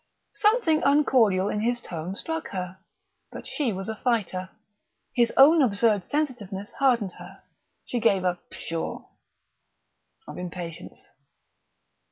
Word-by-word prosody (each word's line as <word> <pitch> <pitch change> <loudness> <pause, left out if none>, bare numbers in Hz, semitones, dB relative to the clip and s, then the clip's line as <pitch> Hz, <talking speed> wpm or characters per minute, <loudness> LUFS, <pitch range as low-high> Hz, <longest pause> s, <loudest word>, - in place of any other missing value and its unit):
Something 415 -6 +3
uncordial 245 -10 +3
in 210 - -1
his 240 +3 0
tone 175 -3 -6
struck 325 +8 -3
her; 185 -1 -6 0.5
but - - -9
she 275 -6 -1
was 190 -1 -5
a 220 - -3
fighter. 200 -6 -1 0.6
His 240 -2 +3
own 305 +4 +8
absurd 210 -5 +2
sensitiveness 215 -10 -3
hardened 240 -8 +2
her. - - -12 0.4
She 245 - -2
gave 205 -5 +2
a 180 -1 0
"Pshaw!" 165 0 -4 1.2
of - - -8
impatience. 175 -2 -8
220 Hz, 120 wpm, -26 LUFS, 185-270 Hz, 1.2 s, own